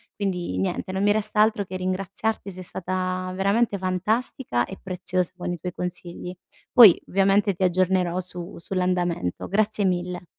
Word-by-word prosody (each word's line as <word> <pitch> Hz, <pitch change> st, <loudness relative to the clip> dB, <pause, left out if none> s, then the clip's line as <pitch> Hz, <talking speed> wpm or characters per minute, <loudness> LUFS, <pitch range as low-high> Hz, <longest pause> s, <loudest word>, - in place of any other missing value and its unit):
Quindi, 180 Hz, -, -2 dB
niente, 95 Hz, -, -2 dB
non 190 Hz, +1 st, -1 dB
mi 205 Hz, -, +4 dB
resta 210 Hz, 0 st, +1 dB
altro 215 Hz, -1 st, +3 dB
che 185 Hz, -, -7 dB
ringraziarti, 195 Hz, +3 st, -2 dB
sei 185 Hz, 0 st, -8 dB
stata 185 Hz, 0 st, -3 dB
veramente 200 Hz, +3 st, +2 dB
fantastica 190 Hz, -, -1 dB
e 195 Hz, -, -9 dB
preziosa 185 Hz, -1 st, -2 dB
con 175 Hz, -, -3 dB
i 175 Hz, -, -4 dB
tuoi 180 Hz, +1 st, -5 dB
consigli. 180 Hz, 0 st, -6 dB, 0.4 s
Poi, 225 Hz, -9 st, +9 dB
ovviamente 195 Hz, +1 st, +3 dB
ti 180 Hz, -, -13 dB
aggiornerò 185 Hz, -1 st, +2 dB
su 180 Hz, -1 st, -7 dB
sull'andamento. 175 Hz, -, -1 dB
Grazie 210 Hz, +1 st, +1 dB
mille. 180 Hz, -1 st, -1 dB
185 Hz, 150 wpm, -24 LUFS, 180-200 Hz, 0.4 s, Poi